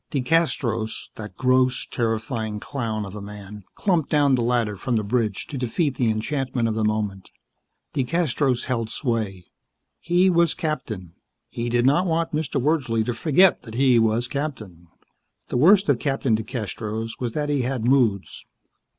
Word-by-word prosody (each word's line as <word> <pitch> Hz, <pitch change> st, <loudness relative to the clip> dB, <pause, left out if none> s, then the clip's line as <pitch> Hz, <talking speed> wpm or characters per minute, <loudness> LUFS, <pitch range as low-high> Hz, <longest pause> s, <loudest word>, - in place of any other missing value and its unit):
DeCastros, 130 Hz, -6 st, 0 dB
that 105 Hz, -1 st, -9 dB
gross, 130 Hz, 0 st, +2 dB
terrifying 110 Hz, -2 st, -2 dB
clown 110 Hz, -5 st, -3 dB
of 95 Hz, -, -9 dB
a 105 Hz, -, -7 dB
man, 105 Hz, 0 st, -9 dB
clumped 175 Hz, -7 st, +1 dB
down 145 Hz, -2 st, +3 dB
the 125 Hz, -, +2 dB
ladder 115 Hz, -3 st, +1 dB
from 120 Hz, +5 st, -2 dB
the 110 Hz, -, +1 dB
bridge 110 Hz, -2 st, -1 dB
to 140 Hz, -, -6 dB
defeat 135 Hz, +4 st, 0 dB
the 120 Hz, -2 st, +1 dB
enchantment 125 Hz, +2 st, -1 dB
of 110 Hz, -, -1 dB
the 110 Hz, 0 st, -1 dB
moment. 105 Hz, -3 st, -2 dB, 0.6 s
DeCastros 135 Hz, -2 st, 0 dB
held 115 Hz, -3 st, -2 dB
sway. 110 Hz, -8 st, -2 dB, 0.5 s
He 175 Hz, +2 st, +3 dB
was 170 Hz, -3 st, +3 dB
captain. 115 Hz, -, -4 dB, 0.4 s
He 120 Hz, 0 st, -3 dB
did 120 Hz, +1 st, +2 dB
not 150 Hz, +8 st, +3 dB
want 165 Hz, 0 st, 0 dB
Mr. 150 Hz, -2 st, -1 dB
Wordsley 130 Hz, -6 st, +1 dB
to 120 Hz, -, -1 dB
forget 155 Hz, +10 st, +4 dB
that 110 Hz, -1 st, -10 dB
he 130 Hz, -2 st, +4 dB
was 115 Hz, +2 st, +1 dB
captain. 110 Hz, -, -5 dB, 0.6 s
The -, -, -1 dB
worst 195 Hz, +8 st, +5 dB
of -, -, +2 dB
Captain 135 Hz, -5 st, +1 dB
DeCastros 110 Hz, 0 st, -4 dB
was 120 Hz, -3 st, -3 dB
that 150 Hz, -1 st, -2 dB
he 145 Hz, -2 st, +1 dB
had 125 Hz, -2 st, -2 dB
moods. 120 Hz, -7 st, +1 dB
120 Hz, 160 wpm, -23 LUFS, 110-140 Hz, 0.6 s, worst